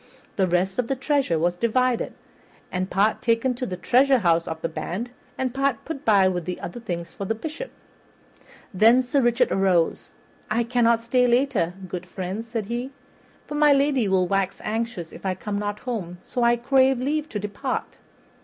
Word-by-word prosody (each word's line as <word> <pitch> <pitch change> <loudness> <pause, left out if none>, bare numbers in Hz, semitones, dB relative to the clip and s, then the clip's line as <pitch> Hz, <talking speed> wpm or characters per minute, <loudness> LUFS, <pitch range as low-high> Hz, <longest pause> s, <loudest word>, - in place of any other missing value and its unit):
The 190 -2 +2
rest 185 +4 0
of 245 - +1
the 270 - 0
treasure 275 - +1
was 175 +2 +1
divided, 240 +4 +1 0.6
and 185 +1 -2
part 205 +5 +2
taken 245 +1 +2
to 250 +1 -4
the 180 - -4
treasurehouse 235 -9 +3
of 160 0 -4
the - - +1
band, 190 +8 -5 0.3
and 255 -2 -1
part 270 -3 0
put 290 -3 -6
by 200 -6 +5
with 180 -3 -2
the 180 - -4
other 175 - -6
things 170 -6 -5
for 200 - -5
the 225 - -1
Bishop. 315 - -6 1.0
Then 230 +6 +5
Sir 270 +3 +1
Richard 240 +1 +2
arose. 185 -4 +1 0.4
"I 225 +3 +1
cannot 235 -1 +2
stay 250 +1 +3
later, 240 -9 +1
good 180 0 -6
friends," 190 +5 -5
said 225 -2 -3
he, 240 +4 -3 0.6
"for - - -7
my 295 -1 +5
lady 275 -5 +2
will 190 -1 +3
wax 195 0 0
anxious 220 -6 -3
if - - -12
I 190 -1 -1
come 200 +2 -4
not 205 0 -3
home; 195 -9 -4
so 250 - -3
I 235 0 +5
crave 260 +1 +3
leave 300 +4 -1
to - - -4
depart." 205 0 -4
230 Hz, 180 wpm, -24 LUFS, 185-255 Hz, 1.0 s, by